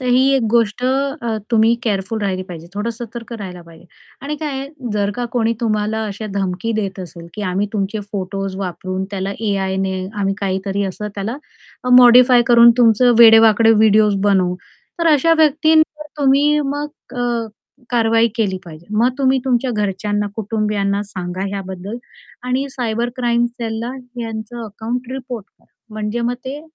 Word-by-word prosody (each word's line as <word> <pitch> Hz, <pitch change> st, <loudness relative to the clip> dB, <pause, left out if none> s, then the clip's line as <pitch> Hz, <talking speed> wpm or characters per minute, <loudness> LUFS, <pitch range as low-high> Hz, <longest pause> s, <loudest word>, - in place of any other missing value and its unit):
तर 255 Hz, -, -4 dB
ही 250 Hz, +1 st, +4 dB
एक 265 Hz, -, +2 dB
गोष्ट 230 Hz, 0 st, +1 dB
अ, 265 Hz, -3 st, -1 dB
तुम्ही 225 Hz, 0 st, +4 dB
केअरफुल 210 Hz, -1 st, -2 dB
राहिली 190 Hz, -2 st, -1 dB
पाहिजे, 170 Hz, -3 st, -9 dB
थोडं 210 Hz, +3 st, -2 dB
सतर्क 235 Hz, +1 st, -8 dB
राहायला 190 Hz, -6 st, -7 dB
पाहिजे 170 Hz, 0 st, -16 dB, 0.4 s
आणि 300 Hz, +2 st, -3 dB
काय 275 Hz, -3 st, -4 dB, 0.3 s
जर 205 Hz, -1 st, 0 dB
का 245 Hz, -, -2 dB
कोणी 230 Hz, -2 st, +1 dB
तुम्हाला 220 Hz, -1 st, 0 dB
अशा 210 Hz, +2 st, -6 dB
धमकी 195 Hz, +3 st, -2 dB
देत 195 Hz, -2 st, -3 dB
असेल, 170 Hz, -1 st, -9 dB
की 210 Hz, -, -5 dB
आम्ही 195 Hz, +2 st, -1 dB
तुमचे 210 Hz, +1 st, -2 dB
फोटोज 195 Hz, 0 st, -4 dB
वापरून 185 Hz, 0 st, -4 dB
त्याला 195 Hz, 0 st, -3 dB
एआयने 190 Hz, -2 st, -1 dB, 0.3 s
आम्ही 195 Hz, 0 st, 0 dB
काहीतरी 195 Hz, 0 st, -1 dB
असं 205 Hz, +2 st, -4 dB
त्याला 210 Hz, +6 st, -4 dB, 0.6 s
मॉडिफाय 245 Hz, 0 st, +7 dB
करून 235 Hz, 0 st, +7 dB
तुमचं 240 Hz, +1 st, +5 dB
वेडेवाकडे 225 Hz, -1 st, +7 dB
व्हिडिओज 215 Hz, -1 st, +4 dB
बनवू. 190 Hz, -3 st, +2 dB, 0.4 s
तर 335 Hz, -, +1 dB
अशा 300 Hz, +3 st, +4 dB
व्यक्तींवर 315 Hz, 0 st, +3 dB
तुम्ही 285 Hz, +2 st, +3 dB
मग 290 Hz, +2 st, -2 dB, 0.3 s
अ, 240 Hz, -2 st, -1 dB, 0.4 s
कारवाई 230 Hz, -1 st, +3 dB
केली 205 Hz, -5 st, 0 dB
पाहिजे. 165 Hz, 0 st, -12 dB
मग 235 Hz, +3 st, +4 dB
तुम्ही 265 Hz, -1 st, +3 dB
तुमच्या 255 Hz, 0 st, +1 dB
घरच्यांना 205 Hz, -1 st, -1 dB
कुटुंबियांना 210 Hz, -2 st, -1 dB
सांगा 185 Hz, -1 st, -5 dB
ह्याबद्दल 195 Hz, +1 st, -6 dB, 0.5 s
आणि 260 Hz, +2 st, 0 dB
सायबर 235 Hz, -2 st, -2 dB
क्राईम 240 Hz, -1 st, +1 dB
सेलला 235 Hz, 0 st, -5 dB, 0.3 s
यांचं 225 Hz, +1 st, -6 dB
अकाउंट 230 Hz, +4 st, -5 dB
रिपोर्ट 250 Hz, -5 st, -6 dB
करा, -, -, -35 dB, 0.3 s
म्हणजे 215 Hz, +2 st, -3 dB
मग 240 Hz, +1 st, 0 dB
ते 275 Hz, +3 st, -5 dB
220 Hz, 150 wpm, -18 LUFS, 195-245 Hz, 0.6 s, मॉडिफाय